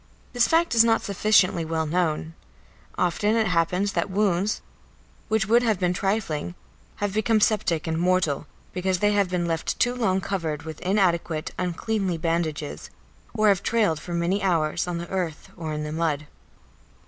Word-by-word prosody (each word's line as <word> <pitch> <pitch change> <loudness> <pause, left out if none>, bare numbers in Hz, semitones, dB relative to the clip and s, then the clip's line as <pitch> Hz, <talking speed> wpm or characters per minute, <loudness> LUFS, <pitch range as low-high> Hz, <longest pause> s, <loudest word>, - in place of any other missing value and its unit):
This 245 -1 +3
fact 330 -1 +2
is 230 -1 +7
not 225 -1 +2
sufficiently 195 -3 +3
well 160 0 -1
known; 160 -1 -1 0.6
often 205 +5 +1
it 225 -1 +2
happens 180 +2 +1
that - - -1
wounds 195 0 0 0.6
which 220 0 +1
would 235 +4 +4
have 225 -4 +1
been 180 -1 +1
trifling 180 -4 -2 0.4
have 205 -1 -2
become 220 +1 +2
septic 195 -7 +1
and 160 -1 -1
mortal 175 -5 +1 0.3
because 185 0 0
they 205 +3 +2
have 200 -3 +2
been 180 -1 -1
left 165 -1 -2
too 245 0 +2
long 200 -7 +1
covered 165 -6 -3
with 160 -1 -8
inadequate, 170 -4 0
uncleanly 185 +1 -1
bandages, 160 - -2 0.5
or 215 -1 +4
have 195 -3 +3
trailed 210 -9 +1
for 175 +1 -5
many 175 +4 0
hours 170 -3 +1
on 175 -1 -2
the 170 0 -5
earth 180 -5 -4
or 160 -3 -5
in 150 0 -3
the 150 - -4
mud. 155 -2 -1
180 Hz, 165 wpm, -25 LUFS, 165-205 Hz, 0.6 s, is